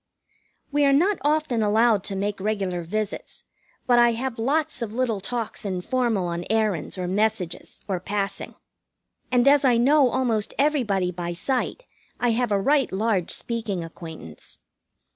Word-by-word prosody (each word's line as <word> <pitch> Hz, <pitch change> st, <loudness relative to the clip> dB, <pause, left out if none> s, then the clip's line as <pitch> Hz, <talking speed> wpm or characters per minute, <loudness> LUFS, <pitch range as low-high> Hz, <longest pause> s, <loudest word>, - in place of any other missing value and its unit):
We 290 Hz, +1 st, +2 dB
are 275 Hz, -1 st, +4 dB
not 370 Hz, +8 st, +3 dB
often 295 Hz, -6 st, +1 dB
allowed 215 Hz, -1 st, +3 dB
to 200 Hz, -, -4 dB
make 200 Hz, +1 st, -2 dB
regular 195 Hz, -3 st, -1 dB
visits, 210 Hz, +5 st, -4 dB, 0.4 s
but 245 Hz, -1 st, +4 dB
I 240 Hz, -1 st, +5 dB
have 235 Hz, 0 st, -4 dB
lots 300 Hz, +5 st, 0 dB
of 225 Hz, -3 st, -3 dB
little 235 Hz, -5 st, 0 dB
talks 230 Hz, +2 st, -4 dB
informal 205 Hz, +2 st, -1 dB
on 170 Hz, 0 st, -3 dB
errands, 215 Hz, -6 st, 0 dB
or 180 Hz, -1 st, -3 dB
messages, 200 Hz, -2 st, -2 dB
or 190 Hz, -3 st, -1 dB
passing; 200 Hz, +2 st, -3 dB, 0.8 s
and 250 Hz, +1 st, +3 dB
as 285 Hz, 0 st, +6 dB
I 250 Hz, -3 st, +4 dB
know 270 Hz, +2 st, +4 dB
almost 235 Hz, -4 st, 0 dB
everybody 235 Hz, -11 st, +1 dB
by 175 Hz, -1 st, -4 dB
sight, 265 Hz, -, -2 dB, 0.3 s
I 245 Hz, -1 st, +2 dB
have 240 Hz, 0 st, 0 dB
a 200 Hz, -, +3 dB
right 275 Hz, +6 st, +2 dB
large 195 Hz, -3 st, 0 dB
speaking 220 Hz, -7 st, -2 dB
acquaintance. 160 Hz, -, -10 dB
220 Hz, 150 wpm, -24 LUFS, 195-255 Hz, 0.8 s, as